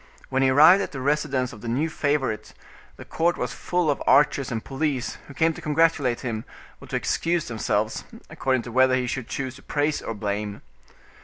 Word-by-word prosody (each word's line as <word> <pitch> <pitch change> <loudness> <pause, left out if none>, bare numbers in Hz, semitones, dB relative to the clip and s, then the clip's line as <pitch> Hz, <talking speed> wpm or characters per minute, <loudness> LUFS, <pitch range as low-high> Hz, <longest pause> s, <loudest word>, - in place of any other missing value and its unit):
When 135 0 +1
he 135 - +4
arrived 155 +9 +7
at - - -4
the 135 - -5
residence 140 -2 0
of 110 - -12
the 120 - -7
new 130 +7 0
favorite, 140 -8 -1 0.4
the - - -11
court 170 +1 0
was 125 0 -3
full 175 0 0
of 140 - -3
archers 140 -3 +4
and 115 -1 -3
police, 135 -2 -2
who 140 - -12
came 160 +2 +2
to - - -10
congratulate 150 -5 +2
him, 115 -3 -3 0.4
or - - -12
to - - -4
excuse 170 -1 0
themselves, 110 -3 -1 0.2
according 130 -2 -1
to 120 - -8
whether 130 +1 +4
he 130 -1 0
should 125 -1 -4
choose 130 -1 -4
to - - -15
praise 145 +1 -1
or 115 - -5
blame. 105 0 -4
135 Hz, 200 wpm, -24 LUFS, 120-150 Hz, 0.4 s, arrived